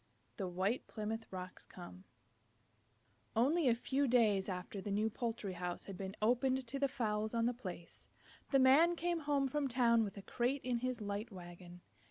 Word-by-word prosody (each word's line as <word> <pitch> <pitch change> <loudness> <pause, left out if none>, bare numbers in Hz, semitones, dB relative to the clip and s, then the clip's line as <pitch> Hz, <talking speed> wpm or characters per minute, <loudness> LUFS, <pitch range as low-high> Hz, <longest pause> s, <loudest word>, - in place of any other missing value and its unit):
THE 195 -4 -2
WHITE 190 +6 -1
PLYMOUTH 225 +1 -4
ROCKS 185 -1 -7
COME 185 +1 -11 1.3
Only 280 +7 +3
a 235 - +5
few 270 +4 0
days 215 -6 +3
after 185 +2 -4
the 205 - -5
new 215 +2 +1
poultry 225 -4 -3
house 175 0 -4
had 195 - -7
been 190 +1 -5
opened 255 +3 +2
to 275 +4 -4
the 280 - +3
fowls 215 -3 -1
on 230 0 +2
the 245 - +2
place, 185 -8 -9 0.4
the 275 - +4
Man 280 +7 +6
came 345 0 -1
home 285 -2 +1
from 290 +1 0
town 235 -2 +4
with 200 -1 -5
a 200 - -7
crate 250 +6 0
in 245 -2 0
his 255 -1 -2
light 205 +2 -3
wagon. 175 -1 -10
225 Hz, 180 wpm, -36 LUFS, 195-260 Hz, 1.3 s, Man